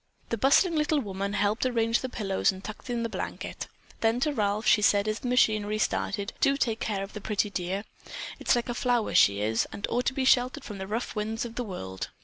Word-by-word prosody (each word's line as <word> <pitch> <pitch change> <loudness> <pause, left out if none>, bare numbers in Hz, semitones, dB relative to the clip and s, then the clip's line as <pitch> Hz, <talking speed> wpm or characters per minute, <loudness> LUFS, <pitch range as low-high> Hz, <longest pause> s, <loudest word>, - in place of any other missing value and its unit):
The 230 - -1
bustling 315 - +4
little 300 0 +2
woman 200 -4 -3
helped 205 +2 +1
arrange 230 -2 +2
the 260 - -4
pillows 195 -6 +1
and 190 0 -10
tucked 215 +4 -8
in 240 -1 -1
the - - 0
blanket. - - -5 0.3
Then 225 +2 +2
to 300 +1 +1
Ralph 210 -2 0
she 210 - +5
said 205 0 +3
as 215 +1 -1
the - - -5
machinery 215 -4 +2
started: 205 -1 -1
"Do 275 0 +4
take 230 -5 0
care 200 -3 -2
of 195 - -9
the 210 - -7
pretty 210 0 -1
dear. 190 +2 -2 0.6
It's - - +3
like 240 +1 -1
a 240 - -2
flower 240 -2 0
she 100 0 +5
is, 110 +2 +1
and 200 - -3
ought 245 +1 0
to - - +1
be 265 - 0
sheltered 250 -1 +3
from 205 -3 -7
the 190 - -5
rough 225 +4 -3
winds 220 +2 -2
of 235 - -7
the 245 - -3
world." 95 - -6
215 Hz, 230 wpm, -28 LUFS, 200-245 Hz, 0.6 s, she